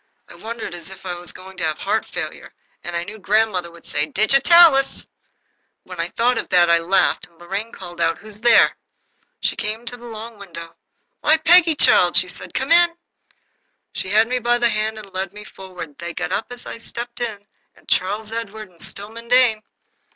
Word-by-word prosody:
I - - -14
wondered 225 -4 -7
if 185 +3 -10
I 180 - -3
were 175 0 -9
going 190 0 -13
to - - -4
have 155 -1 -1
heart - - -1
failure, - - -6 0.3
and 175 - -5
I 170 - -1
knew 215 +4 -10
grandmother 200 -3 +1
would 170 0 -17
say, 150 +1 -1
"Digitalis!" 275 - +5 0.8
When 180 -2 -11
I 165 - 0
thought 245 +5 +1
of - - -6
that 175 -2 +5
I 170 - +5
laughed, 175 +4 +1
and 170 - -29
Lorraine 195 +6 -5
called 175 -1 -9
out, 165 0 +1
"Who's 215 0 -10
there?" 235 -1 +5 0.7
She - - 0
came 220 +3 -4
to 245 +1 -4
the 240 0 -12
long 225 -1 -9
window. 170 -4 -10 0.4
"Why, 310 +1 +4
Peggy, 330 0 +5
child," 175 -10 +5
said 185 - +4
she, - - -11
"come 265 +4 -3
in." 340 0 +6 1.0
She 185 - -4
had 215 +3 +4
me 250 +1 -1
by 240 0 +2
the 240 -1 +2
hand 215 0 -1
and 200 -3 -11
led 190 0 -3
me 210 0 -9
forward. 185 -7 -10
They 170 0 -6
got - - -3
up 220 - -1
as 245 0 -9
I - - -7
stepped 235 +1 -7
in, 210 -4 -4 0.4
Charles 210 +4 0
Edward 220 -2 -6
and 170 - -17
Stillman 210 +4 -7
Dane. 245 -3 +4
210 Hz, 195 wpm, -21 LUFS, 180-235 Hz, 1.0 s, in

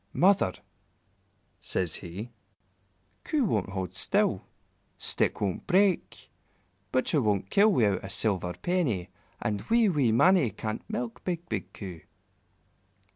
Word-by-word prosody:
"Mother," 185 - +3 1.0
says 90 -4 -1
he, 100 +7 -7 0.9
"Coo 300 -3 +1
won't 105 - 0
hold 95 -2 -4
still, 95 - +1 0.6
stick - - 0
won't 95 -3 -2
break, 190 -1 +1 0.6
Butcher 130 +3 +2
won't 100 -4 0
kill 210 +2 +5
without 105 - +2
a 95 - -6
silver 95 -5 0
penny, 130 - 0 0.3
and 105 -1 -1
wee, 230 -2 +4
wee 140 -9 +2
Mannie 170 +3 +5
can't 110 +2 -5
milk 120 0 -4
big, 175 -2 -3
big 100 -3 -3
Coo." 90 -3 -8
110 Hz, 120 wpm, -28 LUFS, -, 1.0 s, kill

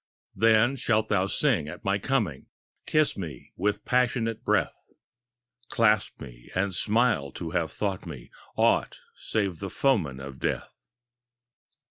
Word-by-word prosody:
Then 115 +4 +4
shalt 110 -3 +1
thou 95 -2 +2
sing 110 - +1
at 85 +3 -9
my 100 +1 +1
coming. 105 - -1 0.4
Kiss 155 -1 +2
me 80 -10 -7
with 105 +3 -1
passionate 120 -3 +1
breath, - - 0 0.8
Clasp 110 -4 +2
me - - -11
and 95 +1 0
smile 105 - +1
to 80 - -6
have 85 -3 -1
thought 95 -3 -3
me 70 -7 -9 0.2
Aught - - +2 0.2
save 100 -6 -2
the 100 - -4
foeman 90 - +1
of 65 -1 -9
Death. - - -4
100 Hz, 130 wpm, -27 LUFS, 80-115 Hz, 0.8 s, Then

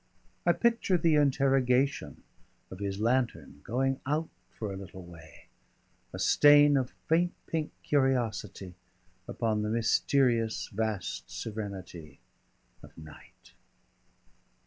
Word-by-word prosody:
I - - +6
picture 230 -6 +1
the 165 -1 +2
interrogation 135 -2 +1 0.5
of 95 - -9
his 100 -1 -4
lantern 120 - -1
going 135 +3 -1
out 155 +3 -1 0.2
for 105 -3 -6
a - - -6
little 95 -1 -10
way, 80 -3 -15 0.7
a - - -7
stain 145 0 +6
of 130 -2 0 0.2
faint 170 +2 +2
pink 160 -2 -2
curiosity 115 -9 -1 0.5
upon 110 -2 -1
the 105 - -2
mysterious 115 0 +1
vast 110 -3 -3
serenity 95 -9 -7 0.6
of - - -16
night. 80 -1 -15
115 Hz, 105 wpm, -29 LUFS, 100-140 Hz, 0.7 s, I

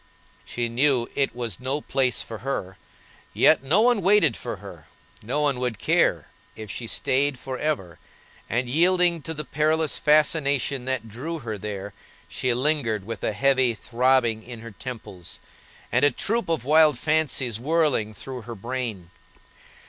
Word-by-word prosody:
She 120 -1 -2
knew 125 0 +2
it 135 -3 0
was 120 -4 -4
no 130 +3 -1
place 130 -3 +1
for 115 -2 -8
her, 100 -6 -4 0.6
yet - - +5
no 155 +10 +3
one 240 -2 +3
waited 185 - +4
for - - -5
her, - - -12 0.3
no 130 +7 -2
one 140 -4 +1
would 125 -4 -2
care - - +2 0.3
if 110 -2 -8
she 115 - -6
staid 135 +3 +1
for 130 0 -6
ever, 95 - -2 0.5
and, 120 +2 0
yielding 175 +4 +3
to 160 +2 -5
the 150 0 -5
perilous 155 +2 +1
fascination 145 -4 +2
that 130 -4 -2
drew 135 +10 -5
her 110 -2 -3
there, 100 0 -6 0.3
she 130 - -2
lingered 120 -6 0
with 115 -1 -6
a - - 0
heavy 130 0 +2
throbbing 120 -1 +1
in 120 0 -10
her 115 0 -9
temples, 100 - -8 0.5
and - - +2
a 145 - +7
troop 230 +6 -1
of 160 -7 -1
wild 155 -1 +5
fancies 145 -5 0
whirling 150 -6 +1
through 130 +1 -7
her 115 +1 -8
brain. 115 -5 -5
130 Hz, 155 wpm, -24 LUFS, 115-150 Hz, 0.6 s, a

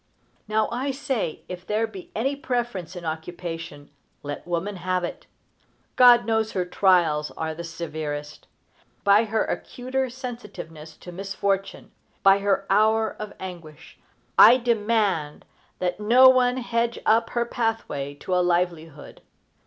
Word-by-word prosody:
Now, 215 0 +1
I 255 +4 -2
say, 265 - -3
if 180 -1 -7
there 215 +4 0
be 200 -5 -10
any 270 +6 0
preference 240 - -3
in 175 -1 -7
occupation, 165 -2 -6 0.3
let 145 +3 -6
woman 175 +3 -2
have 180 +1 -1
it. 175 - -6 0.7
God 245 -2 +7
knows 220 -1 0
her 185 -2 -1
trials 175 -5 +2
are 160 0 -2
the 170 +2 -7
severest. 155 -3 -6 0.6
By 205 +3 +5
her 220 0 0
acuter 260 +1 -3
sensitiveness 210 - -9
to 180 - -11
misfortune, 195 +1 -3 0.3
by 195 0 +6
her 195 -1 0
hour 220 +2 +3
of 210 -1 -6
anguish, 170 -6 -10 0.4
I 235 +4 +9
demand 215 -10 0 0.3
that 180 +1 -2
no 245 +5 +7
one 255 -1 +3
hedge 235 -1 -1
up 225 +1 +3
her 235 - +2
pathway 225 - -3
to 185 - -3
a 180 - +3
livelihood. 170 -4 -2
195 Hz, 135 wpm, -24 LUFS, 170-230 Hz, 0.7 s, I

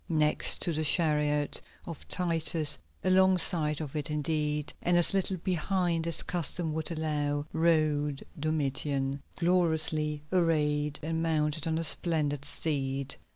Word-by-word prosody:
Next 155 -2 +3
to 170 - +1
the 155 +1 -2
chariot 150 -2 +2 0.2
of 165 -3 -9
Titus, 165 -3 +2 0.2
alongside 185 -5 +3
of 155 -2 -7
it 150 +1 -3
indeed, 150 -1 -2
and 175 0 +2
as 175 - +7
little 190 -1 0
behind 175 -1 -1
as 165 -1 +1
custom 170 -1 -2
would 160 0 -3
allow, 150 -3 -2
rode 155 -3 +1 0.2
Domitian, 140 -2 -1
gloriously 160 -4 0
arrayed 150 -4 +1
and 160 +1 -2
mounted 155 -1 -1
on 160 0 -1
a 165 - -2
splendid 150 -4 0
steed. 140 -3 -2
155 Hz, 125 wpm, -29 LUFS, 150-165 Hz, 0.2 s, as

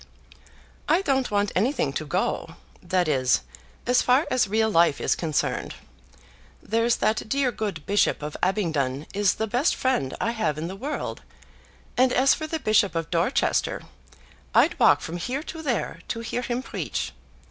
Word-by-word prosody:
"I 335 +5 +3
don't 265 -6 +1
want 205 0 +1
anything 240 +10 +1
to - - -4
go, - - -2 0.3
that 180 -3 0
is, 130 - +2 0.4
as 250 +1 +3
far 260 +5 +3
as 250 -4 +2
real 220 +2 +1
life 165 -5 +4
is - - +2
concerned. 160 -3 -2 0.8
There's 230 +2 +1
that 215 0 0
dear 275 -1 +1
good 205 -9 -4
Bishop 200 -6 +1
of 150 0 -5
Abingdon 155 -8 0
is 200 -1 +2
the 220 - -1
best 245 +9 +1
friend 140 - 0
I 230 - 0
have 220 -10 -1
in 155 - -3
the 190 - -6
world, 275 +9 -4 0.7
and 255 0 +4
as 265 +2 +4
for 310 - -4
the 320 - -2
Bishop 215 - +2
of 165 -1 -3
Dorchester, 170 -1 +1 0.7
I'd - - +4
walk - - +5
from 165 +2 -5
here 255 - -3
to 320 -1 -7
there 260 -8 -2
to 230 - -3
hear 235 +1 -3
him 245 +1 -3
preach. - - -4
215 Hz, 165 wpm, -25 LUFS, 170-255 Hz, 0.8 s, walk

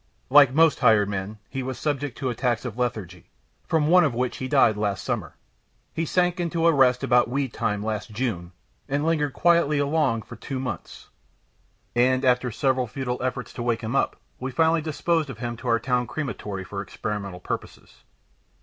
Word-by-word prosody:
Like 140 -2 +8
most 160 +3 +4
hired 110 -5 +4
men, 100 +2 -4
he 135 - -4
was 130 0 -4
subject 145 -4 -2
to 130 -2 -2
attacks 120 0 -1
of 115 -4 -5
lethargy, 110 -8 -4 0.4
from 160 -2 +2
one 180 +3 +6
of 140 -7 0
which 125 0 -1
he 130 - -4
died 110 -4 +4
last 105 -2 -2
summer. - - -3 0.6
He 165 - -1
sank 180 +2 +1
into 170 -1 0
a 170 - +7
rest 125 -3 +4
about 120 -1 +3
weed 135 -1 -2
time, 105 -1 -1
last 110 +2 -3
June, 110 -7 -3 0.4
and 140 +2 0
lingered 150 -4 +1
quietly 170 -3 +3
along 145 -5 +1
for 120 - -11
two 130 +3 -5
months, 130 - -6 0.9
and 130 +2 +3
after 125 0 +3
several 130 +1 0
futile 125 +1 -4
efforts 125 0 -3
to - - -6
wake 120 -1 0
him 115 +4 -3
up, - - +1 0.2
we 130 - -3
finally 160 +5 +2
disposed 160 0 0
of 130 - -7
him 120 0 -4
to 125 - -8
our 115 -1 +3
town 125 0 0
crematory 105 -8 -4
for 100 +2 -5
experimental 100 -1 -5
purposes. - - -7
125 Hz, 185 wpm, -25 LUFS, 115-145 Hz, 0.9 s, Like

